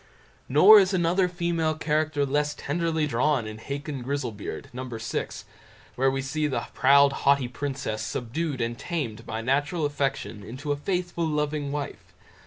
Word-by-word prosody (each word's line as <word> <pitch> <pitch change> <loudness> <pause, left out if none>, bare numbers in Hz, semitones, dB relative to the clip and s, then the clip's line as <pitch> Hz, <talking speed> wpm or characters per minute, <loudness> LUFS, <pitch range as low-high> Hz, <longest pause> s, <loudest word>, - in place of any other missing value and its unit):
Nor 195 +10 +9
is 190 -1 +2
another 180 +1 +2
female 170 -3 -1
character 155 -2 0
less 150 +2 0
tenderly 160 +1 -1
drawn 135 -1 +1
in 110 0 -7
Hacon 140 +2 -5
Grizzlebeard, 125 -6 -4
No. 125 +1 -5
vi, 120 -3 -6 1.0
where 135 +1 +2
we 135 0 -2
see 150 +3 -1
the 135 - -2
proud, 140 +1 +5
haughty 140 -2 +2
princess 130 -3 -4
subdued 135 +3 -3
and 115 0 -2
tamed 120 -10 -4
by 110 - -3
natural 145 +6 0
affection 135 -8 -2
into 130 +8 -5
a - - +2
faithful, 175 +2 -2
loving 150 -1 -1
wife. 145 0 -6
145 Hz, 150 wpm, -26 LUFS, 130-155 Hz, 1.0 s, Nor